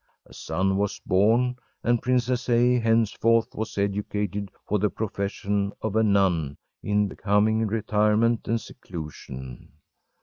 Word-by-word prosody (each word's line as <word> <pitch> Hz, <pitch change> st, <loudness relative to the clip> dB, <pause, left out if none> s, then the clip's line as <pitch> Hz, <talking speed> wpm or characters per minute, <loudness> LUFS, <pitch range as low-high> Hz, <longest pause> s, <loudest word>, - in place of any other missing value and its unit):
A -, -, -18 dB
son 95 Hz, +4 st, -1 dB
was 100 Hz, 0 st, -1 dB
born, 115 Hz, +6 st, +3 dB, 0.3 s
and 120 Hz, -1 st, +2 dB
Princess 125 Hz, 0 st, 0 dB
A. 120 Hz, +1 st, +4 dB
henceforth 115 Hz, 0 st, +2 dB
was 110 Hz, -1 st, -5 dB
educated 100 Hz, 0 st, -2 dB, 0.2 s
for 105 Hz, -, 0 dB
the 105 Hz, +2 st, +2 dB
profession 100 Hz, -1 st, -2 dB
of 110 Hz, -1 st, -2 dB
a 110 Hz, -, +4 dB
nun 95 Hz, -9 st, +2 dB, 0.2 s
in 105 Hz, 0 st, +1 dB
becoming 110 Hz, +3 st, +1 dB
retirement 105 Hz, +1 st, +1 dB
and 115 Hz, 0 st, +1 dB
seclusion. 70 Hz, -, -9 dB
105 Hz, 125 wpm, -25 LUFS, 100-115 Hz, 0.3 s, A